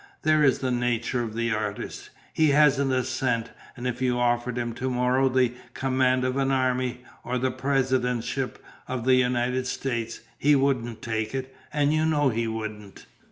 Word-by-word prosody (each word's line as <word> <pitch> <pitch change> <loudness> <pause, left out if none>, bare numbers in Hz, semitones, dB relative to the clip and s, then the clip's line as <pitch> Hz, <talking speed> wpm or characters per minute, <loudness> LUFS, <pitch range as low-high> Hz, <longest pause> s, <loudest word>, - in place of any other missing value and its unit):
There 155 -1 +4
is 135 -3 +4
the 130 -1 -2
nature 120 0 0
of 110 -2 -4
the 115 0 0
artist. 105 -2 -4 0.2
He 155 -1 +3
hasn't 140 -2 +4
a 130 -1 +1
cent; 125 -2 -1 0.3
and 120 - -6
if 125 0 -2
you 125 -1 +1
offered 120 0 0
him 120 -1 -2
to 130 +3 -3
morrow 125 +1 +2
the 125 -2 +2 0.2
command 130 -1 +2
of 130 +1 0
an 135 -1 +1
army, 130 -1 0 0.2
or 125 +1 -2
the 130 +1 0
presidentship 130 -2 0 0.3
of 125 -2 -3
the 130 - +5
United 125 0 +1
States, 115 -3 -3 0.2
he 145 +1 +4
wouldn't 130 -4 0
take 110 +1 -2
it, 130 0 -5 0.2
and 145 0 +2
you 155 0 +2
know 145 -3 +3
he 115 -1 -1
wouldn't." 110 -2 -6
125 Hz, 175 wpm, -26 LUFS, 120-135 Hz, 0.3 s, the